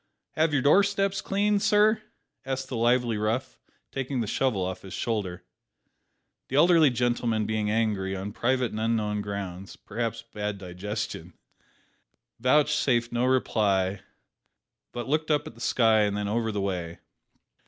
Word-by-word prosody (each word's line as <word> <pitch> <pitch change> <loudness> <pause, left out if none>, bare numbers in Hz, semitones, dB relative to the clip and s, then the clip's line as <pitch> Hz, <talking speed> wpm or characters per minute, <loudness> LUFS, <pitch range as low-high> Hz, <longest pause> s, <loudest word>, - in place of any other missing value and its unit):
"Have 160 0 +1
your 140 -3 +1
door 150 +8 +6
steps 195 -1 0
cleaned, 205 +1 +1
sir?" 215 +2 +4 0.4
asked 135 0 -4
the 130 - -4
lively 120 -1 +2
rough, 110 +4 -2 0.3
taking 135 -1 -3
the 115 - 0
shovel 105 -3 0
off 95 0 -5
his 95 - -8
shoulder. 100 -6 -3 1.0
The 130 - -4
elderly 165 0 +6
gentleman 120 -3 0
being 110 -1 -1
angry, 105 -3 0
on 95 +2 -5
private 125 +2 0
and 110 - -4
unknown 110 -2 0
grounds 100 -2 -6
(perhaps 115 +2 -4
bad 105 -3 -4
digestion), 95 -1 -5 1.1
vouchsafed 130 -2 +2
no 120 +1 +1
reply, 100 -7 +1 0.9
but 120 0 -5
looked 155 +3 0
up 150 -1 +2
at 155 - -9
the 115 - -15
sky 115 -3 +3
and 105 -1 +1
then 105 0 -2
over 110 +1 0
the 105 -1 -2
way. 90 -4 -3
115 Hz, 145 wpm, -27 LUFS, 105-130 Hz, 1.1 s, door